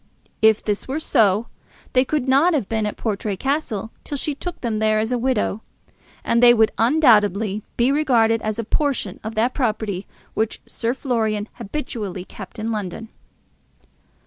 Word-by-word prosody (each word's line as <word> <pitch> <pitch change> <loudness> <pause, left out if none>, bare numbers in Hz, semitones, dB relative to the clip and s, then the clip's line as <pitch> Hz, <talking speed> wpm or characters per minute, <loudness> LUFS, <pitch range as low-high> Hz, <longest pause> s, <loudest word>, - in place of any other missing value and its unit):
If 220 -1 +5
this 205 -2 -2
were 275 +4 -2
so, 215 -7 +3 0.5
they 255 - +5
could 270 -1 -1
not 295 +6 +4
have 260 -10 -1
been 220 -2 -1
at 210 - -5
Portray 205 -2 -2
Castle 230 -5 -2
till 285 - -4
she 295 +2 -2
took 350 +5 -6
them 225 -3 -1
there 215 0 +2
as 220 +2 0
a 250 - +1
widow, 230 -4 0 0.6
and 235 - +2
they 240 0 +8
would 220 -1 +4
undoubtedly 220 - +3 0.2
be 240 +3 +3
regarded 235 -6 +3
as 215 0 -2
a 230 - -2
portion 250 -5 -1
of 220 +1 -5
that 235 +4 +1
property 215 -6 -2 0.3
which 220 0 -1
Sir 235 +2 -2
Florian 220 -6 -1
habitually 205 -7 -5
kept - - -11
in 225 +1 -3
London. 210 +1 -4
225 Hz, 165 wpm, -22 LUFS, 215-260 Hz, 0.6 s, they